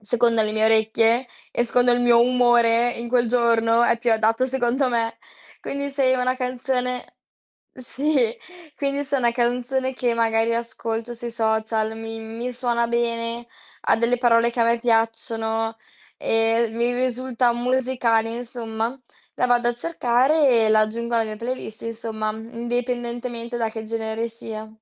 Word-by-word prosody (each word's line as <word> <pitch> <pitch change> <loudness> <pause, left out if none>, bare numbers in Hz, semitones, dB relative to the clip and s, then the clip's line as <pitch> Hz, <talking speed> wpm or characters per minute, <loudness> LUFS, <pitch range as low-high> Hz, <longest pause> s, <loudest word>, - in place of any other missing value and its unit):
secondo 230 +1 +2
le 215 - -1
mie 220 0 +1
orecchie 225 +2 +3 0.3
e 240 - +1
secondo 245 +1 +3
il 245 - +2
mio 240 -1 +5
umore, 240 -1 +4
in 235 0 -6
quel 240 -1 +2
giorno 230 -1 +3
è 235 -1 +3
più 235 -1 +1
adatto 225 +3 +2
secondo 260 +1 0
me. 230 -2 -1 0.4
Quindi 280 0 -4
se 270 -2 +2
una 255 0 0
canzone 250 0 -2 0.7
sì, 260 -1 0 0.4
quindi 280 0 -1
se 280 0 -1
una 240 -3 +2
canzone 250 +2 -1
che 245 -2 0
magari 225 0 +1
ascolto 230 0 -4
sui 235 0 -6
social, 220 -1 -1
mi 225 0 -6
mi 230 +3 -5
suona 235 -1 0
bene, 235 0 -2 0.4
ha - - +3
delle 235 +2 +1
parole 235 -1 +4
che 240 - -10
a - - +4
me 235 +1 +2
piacciono 225 -1 0 0.4
e 225 0 +1
mi 235 +2 0
risulta 250 -1 0
musicale, 240 -2 0
insomma, 235 0 -4 0.4
la 250 - +1
vado 240 -1 +2
a 240 - 0
cercare 270 +1 +2 0.2
e - - +2
la 215 - +5
aggiungo 235 +2 -1
alla 230 -1 +2
mia 215 -1 -6
playlist, 230 -1 -6
insomma, 225 -1 -4
indipendentemente 240 +1 -4
da 225 -2 -1
che 220 0 -7
genere 225 +1 -3
sia. 220 -1 -8
235 Hz, 150 wpm, -23 LUFS, 225-245 Hz, 0.7 s, mio